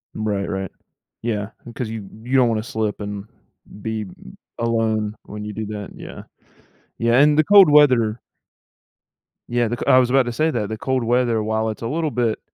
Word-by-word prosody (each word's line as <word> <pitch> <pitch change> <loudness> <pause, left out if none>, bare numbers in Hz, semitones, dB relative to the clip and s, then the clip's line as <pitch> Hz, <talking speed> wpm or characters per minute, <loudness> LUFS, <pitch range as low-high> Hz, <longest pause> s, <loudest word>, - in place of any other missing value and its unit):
Right, 105 -2 -2
right. 95 -1 -4 0.5
Yeah, 105 -3 -2 0.2
because 120 -1 -5
you 110 -3 -6 0.2
you 130 +3 -2
don't 125 -2 +4
wanna 110 -1 -1
slip 110 -3 -3
and 100 -1 -5 0.6
be, 110 0 -3
um, 95 - -13 0.2
alone 110 -2 0
when 105 0 -8
you 105 - -6
do 110 +2 -4
that. 105 -2 -6
Yeah. - - -10 0.7
Yeah, 115 +2 +3
and 150 +1 +5
the 155 - +5
cold 200 -1 +7
weather 125 -7 +4 1.3
Yeah, 120 -1 +1
the 120 - -2
co - - -5
I - - +7
was 125 - +2
about 135 +1 +4
to 120 - -3
say 155 +6 +1
that, 105 -7 -2
the 110 - -4
cold 130 +2 -1
weather, 120 -2 +1
while 110 +1 -1
it's 110 - -6
a 115 - -3
little 155 +1 -1
bit 120 -3 0
115 Hz, 190 wpm, -21 LUFS, 110-125 Hz, 1.3 s, cold